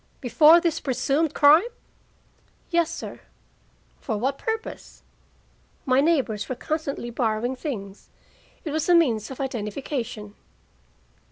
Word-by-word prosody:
"Before 305 +6 +6
this 335 -2 -1
presumed 280 +3 0
crime?" 300 +3 +7 1.1
"Yes, 340 -1 +2
sir." 335 - -7 0.8
"For 220 -5 -3
what 265 +5 -2
purpose?" 445 0 -5 0.8
"My 260 +1 +3
neighbors 270 -10 0
were 255 - -2
constantly 280 -5 -4
borrowing 235 +1 -1
things. 210 - -7 0.6
It 305 - -3
was 315 +3 -1
a 350 - +6
means 235 -11 +2
of 265 - -9
identification." 230 -3 -4
275 Hz, 110 wpm, -24 LUFS, 230-315 Hz, 1.1 s, crime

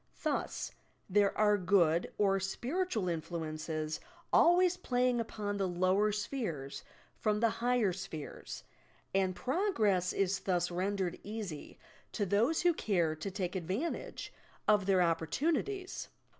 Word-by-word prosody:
Thus, - - -1 0.4
there 200 +1 +3
are 210 -1 +4
good 175 -3 +3
or 195 -1 +3
spiritual 235 - -1
influences 155 -2 -3 0.3
always 355 +1 +6
playing 250 -5 +1
upon 210 -3 -3
the 195 -1 +1
lower 185 +4 +2
spheres 205 - -3 0.4
from 210 -1 +1
the 230 0 +3
higher 240 -6 +2
spheres, 160 -5 -7 0.5
and 190 -1 +2
progress 220 - +1
is 195 0 +1
thus 180 -2 0
rendered 185 0 -1
easy 205 -8 -6 0.4
to 205 - 0
those 230 - +2
who 350 -1 +5
care 175 - +1
to 160 +6 -4
take 185 -1 -3
advantage 190 - -3 0.3
of 210 -2 +4
their 190 -2 +5
opportunities. 305 - -1
195 Hz, 120 wpm, -33 LUFS, 175-230 Hz, 0.5 s, always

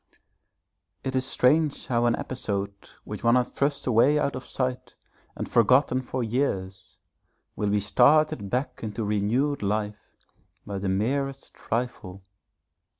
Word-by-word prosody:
It 130 0 -3
is 130 0 +1
strange 145 +4 +2
how 120 -1 +1
an 120 - +3
episode 100 -6 -3 0.3
which - - -7
one 115 +1 +5
has 125 -1 +2
thrust 140 0 -1
away 130 +5 +4
out 140 -1 0
of 130 0 -7
sight 125 -1 -3 0.4
and - - -4
forgotten 130 +3 +3
for 130 0 -3
years 105 -6 -2 0.6
will 105 - -1
be 105 0 +2
started 125 +1 +3
back 125 +5 -2
into 110 +1 -4
renewed 110 +8 0
life 105 +1 -3 0.5
by 100 -1 -4
the 95 0 -2
merest 135 +8 -1
trifle. 105 -6 -4
120 Hz, 135 wpm, -26 LUFS, 105-130 Hz, 0.6 s, one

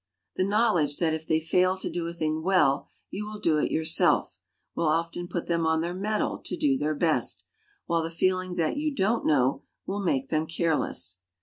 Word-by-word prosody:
The 185 - +1
knowledge 195 -8 +2
that 165 -2 +1
if 160 0 -4
they 160 - +2
fail 180 +3 +2
to - - -4
do 170 -1 -3
a 170 - -5
thing 155 -1 -1
well 175 -6 +2 0.2
you 210 +2 -4
will 210 0 -7
do 155 -5 +2
it - - 0
yourself, 160 +1 +2 0.3
will 170 - 0
often 165 +2 -1
put 175 -1 -3
them 170 -1 +1
on 160 0 +2
their 170 +1 -2
mettle 210 +3 -1
to - - -4
do 295 -4 +2
their 155 - -1
best; 160 +1 0 0.4
while 170 -1 +1
the 165 - -3
feeling 185 +2 0
that 170 - 0
you 300 -1 -1
don't 220 +3 +1
know, 135 -3 +2 0.2
will 200 +1 -3
make 135 -8 0
them 155 0 0
careless. 155 - -1
170 Hz, 200 wpm, -27 LUFS, 160-190 Hz, 0.4 s, knowledge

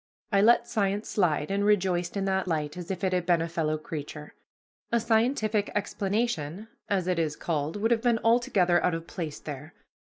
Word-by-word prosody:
I 200 -1 +4
let 235 +2 +5
science 205 0 -1
slide, 160 -5 +1
and 200 +1 +1
rejoiced 185 -3 +1
in 195 - -1
that 190 -1 0
light 150 -3 -2
as 180 -1 -7
if 190 0 -4
it 185 -1 +1
had 180 -1 +1
been 175 -2 +4
a 165 - -1
fellow 160 -2 -1
creature. 150 -1 -7 0.6
A 235 - +3
scientific 220 -2 +1
explanation, 200 -2 -2 0.2
as 195 -3 +1
it 180 -2 0
is 155 -2 0
called, 155 -2 -2
would 220 +3 0
have 230 -1 +3
been 240 -1 +3
altogether 195 -7 +3
out 180 - +2
of 165 0 -6
place 160 -4 -5
there. 145 +2 -8
185 Hz, 190 wpm, -27 LUFS, 165-210 Hz, 0.6 s, let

